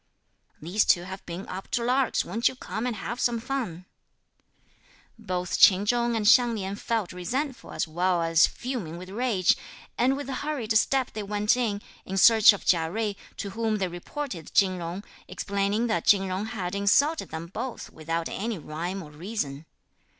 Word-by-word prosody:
(These 180 +7 +1
two 175 - +4
have 190 +1 -8
been 175 +3 -6
up 190 +1 -6
to 235 - 0
larks, 255 +2 +1
won't 225 +7 +1
you - - -1
come 240 -1 -4
and 240 - -2
have 235 +4 -5
some 235 -1 +1
fun!) 230 -9 -4 1.3
Both 180 -4 -2
Ch'in 195 +1 +7
Chung 235 +1 +1
and 220 -2 -1
Hsiang 240 0 +6
Lin 195 -1 -3
felt 220 -3 -2
resentful 255 - -3
as 190 - -2
well 175 +2 +1
as 165 0 +5
fuming 230 -11 -5
with 185 +1 -9
rage, 215 -5 +2 0.4
and 260 +3 +3
with 285 - -6
hurried 265 -5 -2
step 260 +3 +2
they 215 - -4
went 210 +2 +1
in, 215 -5 -1 0.2
in 195 - -5
search 225 +2 +8
of 200 - -6
Chia 165 -2 +3
Jui, 215 +2 -2 0.2
to 200 - -5
whom 225 +1 -1
they 190 -2 0
reported 175 - -6
Chin 185 -2 +4
Jung, 175 +4 -5 0.2
explaining 200 +3 -1
that 175 -8 -1
Chin 200 -2 +6
Jung 190 +3 -3
had 195 -5 -4
insulted 275 +11 +2
them 160 +1 -5
both, 230 +8 -6
without 165 +1 -3
any 220 +1 -3
rhyme 170 +5 -5
or 150 - -12
reason. 155 -3 -5
200 Hz, 175 wpm, -26 LUFS, 180-235 Hz, 1.3 s, search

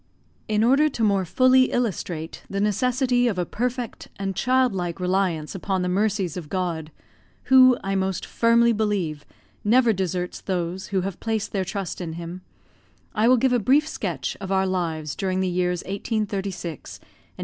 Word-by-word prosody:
In 215 0 +1
order 275 +6 +4
to 235 -5 -3
more 200 -3 +2
fully 255 +7 +5
illustrate 180 -10 -3
the 195 - -2
necessity 245 +4 +2
of 210 -6 -1
a 180 - 0
perfect 245 +2 -3
and 195 -1 -3
child 255 0 +2
like 175 -1 -3
reliance 180 -4 0
upon 190 -1 -2
the 180 - -1
mercies 200 -4 0
of 170 -5 -7
God 170 -4 -3 0.6
who, 255 -1 +8
I 195 - -1
most 190 -2 -1
firmly 235 0 +3
believe, 195 -9 -1 0.4
never 235 +2 +4
deserts 180 -2 -3
those 180 0 -3
who 195 -2 0
have 190 -1 -5
placed 220 -2 -2
their 195 -2 0
trust 190 -1 -4
in 165 -2 -4
Him 170 +2 -7 0.7
I 220 +1 +2
will 255 +1 +6
give 255 +1 +2
a 245 - +3
brief 280 +7 +3
sketch 170 - -3
of 195 0 -5
our 190 0 +2
lives 165 -5 -2
during 185 -1 -1
the 190 - +1
years 180 -1 0
1836 195 - -4
and - - -28
1837. - - -27
195 Hz, 170 wpm, -24 LUFS, 180-230 Hz, 0.7 s, who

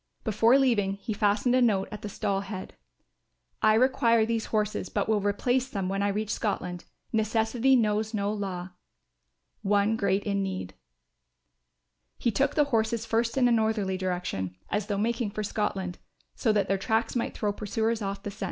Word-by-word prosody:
Before 225 +3 +4
leaving 225 -8 +2
he 200 +3 -5
fastened 210 +4 +2
a 255 - +4
note 205 -5 +2
at 210 - -7
the 210 - -5
stall 200 -1 -1
head: 195 -1 -7 0.9
"I 215 0 +5
require 230 -2 +4
these 225 0 -1
horses 210 -1 -1
but 205 - -1
will 215 -2 +2
replace 245 +6 +1
them 195 -5 -2
when 195 +1 -1
I 200 - +2
reach 210 +1 -1
Scotland. 180 -5 -3 0.3
Necessity 225 +4 +2
knows 215 -2 +1
no 205 -2 -1
law. 190 -3 -4 0.9
One 205 0 +2
in 225 - +1
great 200 -1 +1
need." 195 - -2 1.4
He 235 - +1
took 275 +7 +1
the 300 - +5
horses 225 0 +1
first 230 +2 0
in 250 -2 +5
a - - +3
northerly 220 -4 +1
direction 180 - -3 0.2
as 205 0 -1
though 205 -2 -1
making 230 +1 0
for 215 +1 -4
Scotland, 195 -3 -2 0.3
so 225 - +1
that 210 -2 +1
their 195 0 +1
tracks 225 +4 0
might 235 - -2
throw 205 -2 0
pursuers 220 +2 -1
off 195 0 -4
the 205 - -4
scent. 210 - -16
210 Hz, 175 wpm, -28 LUFS, 200-225 Hz, 1.4 s, I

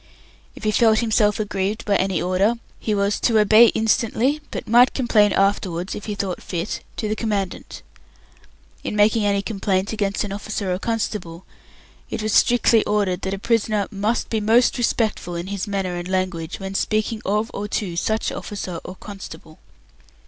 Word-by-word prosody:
If - - -12
he 215 - +2
felt 220 0 +4
himself 220 -2 +2
aggrieved 205 0 -2
by 205 - +2
any 190 -2 0
order, 185 +5 +1 0.2
he 215 - -1
was 200 +1 0
"to 230 -2 +2
obey 215 +2 +7
it - - 0
instantly, 230 +6 +1
but - - -6
might 240 +3 +5
complain 215 -5 +3
afterwards, 190 -2 0
if 205 - -7
he 210 - -3
thought 195 -3 -3
fit, 175 +2 -4 0.2
to 215 - -2
the 215 - -1
Commandant. 205 -5 -3 1.0
In - - -3
making 210 +1 +3
any 200 -1 +1
complaint 195 -2 -1
against 200 -2 -1
an 205 - -5
officer 200 -1 -3
or 180 - -3
constable 205 -6 -3 0.6
it 215 - -4
was 215 -1 -1
strictly 235 -2 +4
ordered 200 -4 0
that 190 +1 -2
a - - -7
prisoner 215 -1 0
"must 210 +3 -1
be 220 - +1
most 235 +4 +3
respectful 220 -7 0
in 170 +1 -4
his 200 +1 -4
manner 195 -3 -2
and 175 0 -5
language, 185 -3 -2
when 195 0 -5
speaking 215 +2 -1
of 210 +3 0
or 205 - -4
to 200 -4 -3
such 220 +5 -1
officer 190 -5 -5
or 185 - -8
constable". 195 -6 -10
205 Hz, 175 wpm, -22 LUFS, 190-220 Hz, 1.0 s, obey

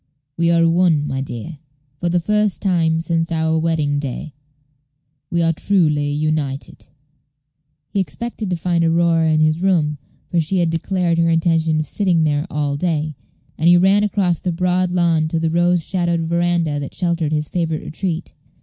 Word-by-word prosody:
We 170 0 +1
are 165 0 +4
one, 165 -3 +2
my 135 -2 -3
dear. 135 +4 -7 0.4
For 175 - -1
the 175 +1 +2
first 210 +2 0
time 165 -4 +1
since 165 0 -1
our 160 0 +1
wedding 155 -3 0
day, 140 +1 -5 1.0
we 170 -1 0
are 165 0 +2
truly 155 -5 +1
united." 150 -2 -3 1.0
He 200 - -2
expected 215 +4 -4
to 180 - 0
find 170 0 0
Aurora 165 -1 +2
in 155 0 +2
his 155 0 +3
own - - -5
room, 150 -5 +1 0.3
for 175 - +2
she 165 +4 0
had 170 -2 +1
declared 170 0 0
her 165 0 +3
intention 165 -1 +2
of - - -4
sitting 175 0 +1
there 150 +1 0
all 145 -1 -2
day; 155 -2 -1 0.4
and 160 - +2
he 175 0 +7
ran 195 +3 +4
across 195 -5 0
the 180 - -2
broad 180 +1 0
lawn 170 -3 +2
to 160 +1 -1
the 160 0 0
rose 175 0 +2
shadowed 175 -3 0
veranda 170 -2 0
that 140 - -7
sheltered 170 -4 -1
his 150 -1 -1
favorite 160 -2 -2
retreat. 170 0 -4
165 Hz, 175 wpm, -19 LUFS, 155-175 Hz, 1.0 s, he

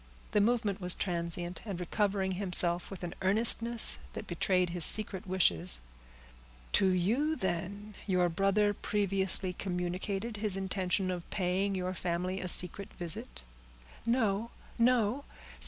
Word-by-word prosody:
The 210 - +2
movement 215 -3 0
was 180 0 +1
transient, 175 -1 -3
and 200 -5 -6
recovering 195 +1 -1
himself, 180 -2 0
with 195 -2 -9
an 175 - -5
earnestness 230 +4 +7
that - - -7
betrayed 180 0 -1
his 175 -1 +1
secret 195 -2 +4
wishes,— 90 - +1 0.9
"To 195 - +3
you, 220 - 0
then, 200 - -5
your 180 -2 +1
brother 195 +4 +1
previously 195 -3 0
communicated 190 +4 -4
his 205 -2 +1
intention 190 0 -2
of 175 -2 -7
paying 195 +1 -1
your 185 0 -3
family 180 +1 -3
a 185 - -5
secret 180 +3 +1
visit?" 155 - -5 0.6
"No!—no!" 235 +2 -1
190 Hz, 120 wpm, -30 LUFS, 180-205 Hz, 0.9 s, earnestness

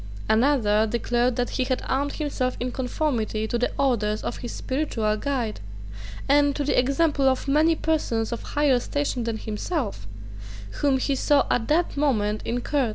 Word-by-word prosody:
Another 220 -3 +3
declared 240 +2 0
that 245 0 -1
he 260 - 0
had 255 0 -2
armed 280 +2 0
himself 275 -4 -2
in 250 +1 -2
conformity 245 -5 -1
to 240 - -1
the 245 - +1
orders 220 -6 +1
of - - -3
his 240 - -6
spiritual 250 -6 -1
guide, 240 -2 -2 0.7
and 285 0 +4
to 290 - -1
the 285 - 0
example 275 +2 +2
of 260 +1 -1
many 310 +4 +4
persons 250 -9 -1
of 235 - -4
higher 290 -4 +2
station 275 -2 -2
than 230 -1 -2
himself, 215 - -4 0.7
whom 280 -2 +3
he 275 +2 0
saw 280 +1 +3
at 225 -2 +1
that 335 +3 +1
moment 215 -8 +1
in 245 +1 -1
Court. 275 -4 0
255 Hz, 165 wpm, -25 LUFS, 230-285 Hz, 0.7 s, and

